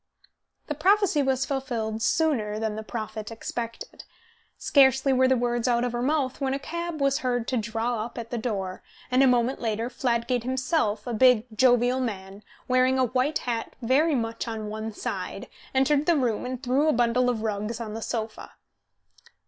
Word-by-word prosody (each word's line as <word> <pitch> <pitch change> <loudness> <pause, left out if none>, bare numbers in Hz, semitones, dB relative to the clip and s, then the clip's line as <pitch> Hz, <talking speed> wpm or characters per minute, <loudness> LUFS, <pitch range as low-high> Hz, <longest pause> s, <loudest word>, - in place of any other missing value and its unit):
The 300 - -3
prophecy 375 0 +3
was 265 -1 +1
fulfilled 235 -6 -3
sooner 235 -6 +1
than 220 -1 -2
the 220 - -4
prophet 215 -1 -6
expected. 230 - -6 0.5
Scarcely 270 -1 +4
were 260 0 +4
the 260 0 +3
words 240 0 0
out 240 -1 +2
of 245 - -1
her 240 0 -3
mouth 275 0 0
when 270 0 0
a - - -1
cab 340 +3 -5
was 275 0 +2
heard 245 -2 -1
to 255 - 0
draw 225 +1 -1
up 235 - -9
at 230 -1 -6
the 240 - -2
door, 195 -5 -3 0.3
and 255 +1 +4
a 270 - +6
moment 250 +1 +2
later 225 +1 -2
Fladgate 245 -1 0
himself, 255 -4 -1
a 245 - -3
big, 245 -1 +5
jovial 245 +1 +4
man, 200 -5 -5 0.3
wearing 255 +1 +3
a 260 - +3
white 255 +5 0
hat 230 -2 -3
very 275 +6 +2
much 230 -1 -3
on 220 -2 -4
one 220 +1 -4
side, - - -5 0.3
entered 280 +2 +3
the 340 -2 +4
room 245 -3 0
and 255 +1 -5
threw 270 +4 +2
a 310 - +4
bundle 245 +1 +2
of 225 -3 -2
rugs 215 +1 -2
on 220 -2 -5
the 225 - -5
sofa. 220 -1 -5
245 Hz, 180 wpm, -26 LUFS, 225-265 Hz, 0.5 s, a